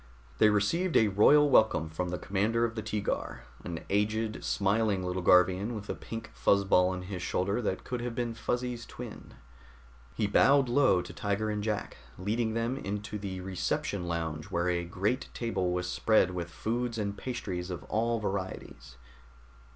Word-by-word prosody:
They 110 - +7
received 155 - +2
a 110 - +4
royal 145 +10 +6
welcome 110 - +4
from 85 +3 -3
the 90 - -2
commander 105 +5 +1
of 115 - -3
the 110 - -4
Teegar, 105 -1 -3 0.2
an 85 -2 -5
aged, 110 +2 0
smiling 100 -1 +1
little 90 0 -2
Garvian 90 +5 +4
with 105 -1 -5
a - - -1
pink 115 -1 -8
fuzz 100 0 +3
ball 90 -1 +4
on 90 0 -4
his 90 -1 -6
shoulder 100 +5 0
that 110 - -2
could 125 -1 -4
have 120 -1 -4
been 120 -1 -2
Fuzzy's 120 +1 -3
twin. - - -9 0.8
He 110 - 0
bowed 135 +6 +4
low 125 -8 +4
to - - -9
Tiger 100 +1 -1
and 105 0 -2
Jack, 105 -1 -3 0.2
leading 110 +4 -1
them 115 +3 -1
into 105 -2 -4
the 95 -2 -5
reception 95 0 -2
lounge 80 -3 -3
where 85 +1 0
a 85 -1 0
great 100 +9 -1
table 95 -7 -1
was 90 0 -1
spread 100 0 +3
with 85 -2 -4
foods 115 +7 -2
and 100 -2 -2
pastries 100 -7 -4
of 90 -2 -5
all 115 +2 0
varieties. 95 - -5
105 Hz, 170 wpm, -30 LUFS, 90-115 Hz, 0.8 s, They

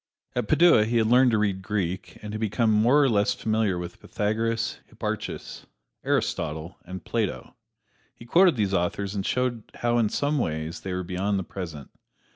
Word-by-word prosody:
At - - -1
Padua 165 -11 +5
he 120 +2 0
had 110 - +3
learned 125 +3 +5
to 110 - +2
read 100 -3 0
Greek, 95 -2 -3
and 105 0 -6
had 110 - -3
become 110 +1 +1
more 120 +7 +4
or - - +4
less 105 -4 +2
familiar 110 -4 0
with 90 0 -7
Pythagoras, 115 +2 -1
Hipparchus, - - -5 0.4
Aristotle 80 +4 -1
and 95 +1 -8
Plato. 110 -5 -2 0.6
He 115 - -13
quoted 175 +6 +5
these 100 -4 0
authors 95 +2 -1
and 100 -2 -2
showed 125 +1 0
how 120 0 +1
in 110 -3 +2
some 145 +4 0
ways 80 -5 -3
they 95 - -5
were 90 0 -2
beyond 95 +3 -1
the 95 - -2
present. 80 -6 -7
105 Hz, 175 wpm, -26 LUFS, 95-115 Hz, 0.6 s, Padua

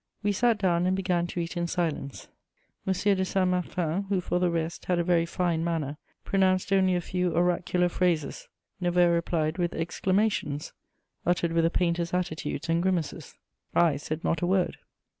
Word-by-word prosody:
We 205 - +2
sat 230 +3 +2
down 180 -3 +2
and 185 - +2
began 180 -2 0
to 175 - -5
eat 170 0 -3
in 170 0 -1
silence. 160 -6 -3 0.6
M. 190 - +3
de 190 0 +2
Saint 185 0 +1
Martin, 180 0 -1
who, 195 -2 +2
for 180 0 -1
the 180 -1 +2
rest, 165 0 -3
had 180 - +1
a 170 - +2
very 170 -1 +2
fine 170 -2 0
manner, 155 -4 -2 0.3
pronounced 190 -1 +2
only 190 -1 +4
a 175 - 0
few 180 -1 -1
oracular 180 0 +2
phrases. 175 -4 -1 0.3
Neveu 175 -1 +3
replied 170 -1 0
with 175 -1 0
exclamations, 175 -3 -1 0.5
uttered 175 -1 +1
with 165 0 +3
a - - +4
painter's 170 0 0
attitudes 170 -2 -3
and 165 +1 +2
grimaces. 180 -4 -2 0.4
I 165 -5 +4
said 155 +3 -5
not 170 - 0
a 175 - +1
word. 185 -1 +1
175 Hz, 175 wpm, -27 LUFS, 170-185 Hz, 0.6 s, only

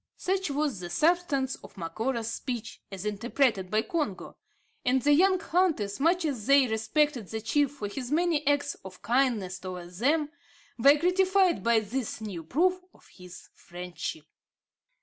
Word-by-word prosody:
Such 380 -2 -1
was 285 -6 -1
the 175 -1 -6
substance 300 - +1
of - - -15
Macora's 225 +7 -3
speech, 245 -4 -5
as 195 0 -7
interpreted 210 -1 0
by 215 +3 +1
Congo; 300 - -3 0.5
and 255 +1 +3
the 290 +1 +5
young 370 +4 +4
hunters, 320 - 0
much 335 +4 +2
as 255 -8 -3
they 275 -1 +6
respected 230 +2 0
the 220 - -4
chief 280 +6 +1
for 270 -7 -6
his 245 +5 -6
many 325 -1 +2
acts 285 0 +2
of 185 -1 -12
kindness 225 -6 +1
towards 180 -1 -8
them, 300 +4 +1 0.5
were 280 +5 +7
gratified 370 +2 +2
by 230 -1 +3
this 220 +3 -4
new 200 -7 -6
proof 360 - +1
of - - -22
his 180 -1 -13
friendship. 175 -3 -7
260 Hz, 150 wpm, -28 LUFS, 205-305 Hz, 0.5 s, were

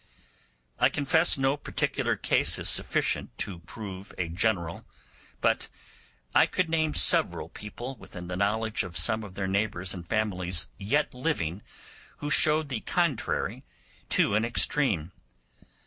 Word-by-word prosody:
I - - +5
confess 160 +3 +2
no 135 +1 +2
particular 145 - -1
case - - +2
is - - -1
sufficient - - +1
to 90 -3 -2
prove 95 +2 -9
a 85 -2 -2
general, 85 -2 -1 0.6
but - - +1 0.6
I - - +5
could 185 -3 -1
name 160 -2 +1
several - - +3
people 120 +5 -8
within 90 -4 -10
the 90 - -4
knowledge 105 +3 0
of 90 -3 -5
some 110 -1 +2
of 100 -3 -10
their 100 - -2
neighbours 95 -2 -1
and 90 -2 -7
families 95 -5 0
yet 140 +10 0
living 125 - -2 0.6
who 145 +1 -4
showed 155 -1 +5
the 125 -5 -2
contrary 170 -1 -1 0.5
to - - +3
an 105 +1 +2
extreme. 115 - +1
105 Hz, 135 wpm, -28 LUFS, 90-140 Hz, 0.6 s, I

